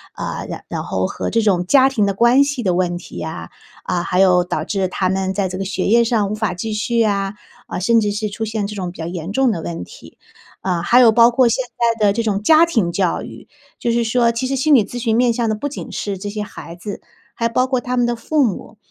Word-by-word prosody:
呃， - - -5
然 - - -7
然 - - -3
后 95 0 -1
和 - - -4
这 230 - +1
种 190 -5 +1
家 265 +7 +5
庭 230 -7 +1
的 200 - 0
关 235 +6 +4
系 280 -3 -3
的 185 -3 +1
问 175 -1 0
题 - - -11
呀， 120 - -6 0.3
啊， 175 - -1
还 180 +2 +1
有 180 -2 +4
导 - - -2
致 195 -3 -1
他 185 0 -1
们 190 0 -1
在 195 -1 -1
这 185 - -5
个 195 - -3
学 195 -1 -2
业 235 +2 +4
上 220 -4 +1
无 - - -1
法 215 -3 -2
继 200 +5 -5
续 225 +3 -1
呀， 200 -2 0 0.3
呃， - - -5
甚 230 +4 +4
至 205 -2 0
是 210 +1 -2
出 215 +2 -4
现 215 -1 -2
这 210 +1 -6
种 185 -2 -3
比 - - -16
较 160 - -5
严 175 +1 -5
重 265 +1 +3
的 175 -6 -3
问 165 0 -5
题。 - - -14 0.4
呃， 180 -3 -1
还 240 +8 +5
有 235 -2 +7
包 230 +1 +6
括 245 0 +3
现 250 +3 -1 0.3
在 215 - +3
的 200 - +4
这 230 +2 -1
种 205 -3 -1
家 315 +9 +6
庭 220 - 0
教 185 -3 0
育。 - - -11 0.3
就 235 - -1
是 235 0 +1
说 235 +1 +2
其 230 +3 -2
实 270 - -1
心 290 +3 +2
理 235 -7 +5
咨 240 - -8
询 230 -2 0
面 245 -1 +3
向 230 -1 -1
的 - - +1
不 250 +7 -4
仅 285 - -7
是 200 -2 -4
这 205 +2 -6
些 210 +1 -4
孩 170 -4 -10
子， 205 +3 -7 0.3
还 230 0 -1
包 255 +2 +1
括 255 -2 0
他 250 0 -3
们 245 - +3
的 240 0 0
父 300 +6 0
母。 215 0 -5
215 Hz, 285 characters per minute, -19 LUFS, 190-235 Hz, 0.4 s, 有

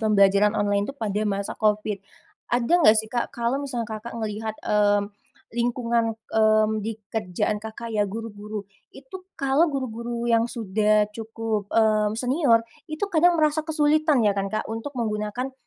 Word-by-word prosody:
pembelajaran 205 -1 +4
online 205 +1 +1
tuh 275 - -6
pada 210 -3 -2
masa 200 0 -2
Covid. 210 -1 +1 0.5
Ada 240 +5 0
enggak 220 -7 +7
sih 220 +1 -1
Kak, 240 - -1
kalau 240 +4 -1
misalnya 250 -5 -3
Kakak 225 +2 -7
ngelihat, 220 0 -4
mmm 205 -1 +2 0.4
lingkungan, 235 -2 0 0.2
mmm 215 0 +3
di 220 +1 -4 0.2
kerjaan 210 0 -1
Kakak 220 +1 -7
ya, 205 -2 +1
guru-guru, 210 -1 -6 0.2
itu 270 +7 -11 0.2
kalau 275 +5 +2
guru-guru 235 -3 -4
yang 230 +1 +3
sudah 215 -1 +2
cukup, 220 -2 -4
mmm, 215 -1 +2
senior, 250 -2 +2 0.2
itu 310 +6 -2
kadang 340 +2 +4
merasa 310 0 +2
kesulitan 305 -4 +3
ya 205 - +4
kan, 195 0 -2
Kak, 215 - -2
untuk 225 +5 -6
menggunakan 220 +3 -2
225 Hz, 150 wpm, -24 LUFS, 210-245 Hz, 0.5 s, enggak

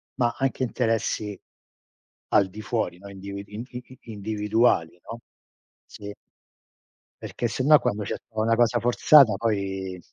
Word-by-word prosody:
ma 120 -2 +1
anche 135 -1 -1
interessi 115 -4 -1 0.9
al 100 - +3
di 110 +3 -9
fuori, 110 -4 -2
no, 100 0 -11
individ 100 +1 -8
i 105 +3 -7
i 125 0 -7 0.2
i 115 - -11
individuali, 105 -4 0
no, 115 +1 -8 0.7
sì. 100 0 -10 1.1
Perché 120 - -3
sennò 145 +6 +4
quando 105 0 -2
ce - - -3
sta 110 -1 -6
una 115 +1 +2
cosa 120 0 +2
forzata 120 0 +5
poi 95 -4 -3
110 Hz, 135 wpm, -25 LUFS, 100-120 Hz, 1.1 s, forzata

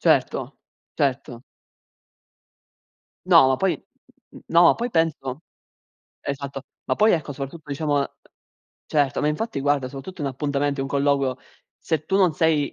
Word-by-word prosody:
Certo, - - +1 0.4
certo. 130 -3 -1 1.8
No, 130 - +7
ma 130 - +2
poi 190 +3 +1 0.6
mhmm, - - -13
no, 170 +1 +5
ma - - +7
poi 240 +1 -3
penso 155 - -1 0.8
Esatto. 140 -1 -4 0.2
Ma - - 0
poi, 215 +1 +4
ecco, 150 -3 -1
soprattutto, 145 +3 -8
diciamo, 145 0 0
uhm 140 - 0 0.8
Certo, 145 -2 +1
ma 150 - +2
infatti, 155 +1 -2
guarda, 140 -1 +1
soprattutto 140 +7 -9
in - - -1
appuntamento, 140 +1 -1
un - - -3
colloquio, 140 -2 +1 0.4
se 160 -2 -2
tu 195 - 0
non 185 -5 +3
sei 155 -3 +2
145 Hz, 140 wpm, -23 LUFS, 135-160 Hz, 1.8 s, No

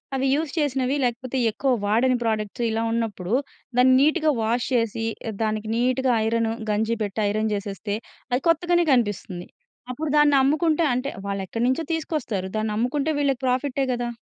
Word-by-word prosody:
అవి 265 0 0
యూజ్ 300 -1 -1
చేసినవి 270 -2 +1
లేకపోతే 250 +2 -2
ఎక్కువ 265 +4 0
వాడని 245 +4 +3
ప్రొడక్ట్స్ 220 +1 -2
ఇలా 225 +1 -1
ఉన్నప్పుడు, 220 -4 -2 0.4
దాన్ని 255 +1 +6
నీట్‌గా 310 +1 +3
వాష్ 230 +2 0
చేసి 230 -1 0 0.4
దానికి 215 0 -2
నీట్‌గా 255 +2 +1
ఐరన్, 230 0 +1 0.2
గంజి 220 +2 0
పెట్టి 205 +1 -3
ఐరన్ 215 +1 0
చేసేస్తే, 200 +1 -3 0.4
అది 250 +2 +1
కొత్తగానే 345 +1 +3
కనిపిస్తుంది. 205 -6 -1 0.4
అప్పుడు 300 +5 -4
దాన్నమ్ముకుంటే 295 +3 +3
అంటే, 255 +3 -1 0.2
వాళ్లెక్కడినుంచో 230 - -1
తీసుకొస్తారు. 295 - -2
దాన్నమ్ముకుంటే 240 +7 -1
వీళ్ళకి 275 -3 0
ప్రాఫిటే 265 +2 0
గదా! 240 0 -2
245 Hz, 135 wpm, -24 LUFS, 220-275 Hz, 0.4 s, దాన్ని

